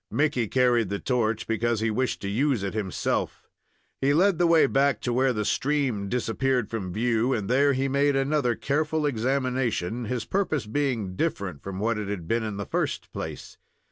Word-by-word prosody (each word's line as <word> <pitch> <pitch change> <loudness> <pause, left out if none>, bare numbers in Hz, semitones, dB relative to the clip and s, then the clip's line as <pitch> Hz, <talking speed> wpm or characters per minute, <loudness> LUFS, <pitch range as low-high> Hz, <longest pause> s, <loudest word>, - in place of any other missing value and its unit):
Mickey 130 -1 +1
carried 120 -3 +2
the 100 - -1
torch, 115 -2 0
because 115 0 0
he 110 0 0
wished 130 +1 -1
to - - -2
use 120 +2 +1
it 100 - -3
himself. 105 -4 -2 0.6
He 140 +2 +3
led 185 +1 +3
the 175 - +4
way 165 -3 +5
back 135 -3 +2
to 120 - -1
where 130 +2 +3
the 105 -3 -2
stream 130 -7 0
disappeared 125 0 0
from 100 -5 -3
view, 115 +4 +1
and 105 -5 -2
there 140 +4 +3
he 135 +1 0
made 140 +1 +2
another 135 -3 +1
careful 150 +4 0
examination, 125 -4 -1
his 115 0 -3
purpose 160 - -1
being 110 -6 -1
different 100 - -2
from 95 +2 -6
what 110 +2 0
it 105 - -4
had 95 -5 -4
been 115 +4 +1
in 105 -2 -4
the 100 - -4
first - - -2
place. - - -7
125 Hz, 185 wpm, -26 LUFS, 110-140 Hz, 0.6 s, way